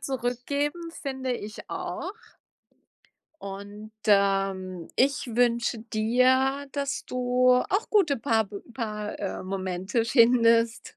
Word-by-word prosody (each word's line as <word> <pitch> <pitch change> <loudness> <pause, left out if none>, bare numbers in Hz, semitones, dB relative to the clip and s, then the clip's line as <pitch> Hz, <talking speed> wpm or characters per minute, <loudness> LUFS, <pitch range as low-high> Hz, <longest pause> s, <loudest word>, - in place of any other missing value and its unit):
zurückgeben, 280 +6 -2
finde 265 -4 -4
ich 215 -3 -7
auch. 385 - -4 1.3
Und, 205 +2 -8
ähm, 195 -3 +1
ich 280 +1 +2
wünsche 235 -1 +1
dir, 255 +5 +2
dass 280 -1 -3
du 250 0 +2
auch 390 - +1
gute 355 -10 +3
Paarbe 220 -4 -1
Paar 210 -3 -4
äh, 195 -2 -4
Momente 190 +3 -2
findest. 230 -1 +3
235 Hz, 100 wpm, -26 LUFS, 210-265 Hz, 1.3 s, gute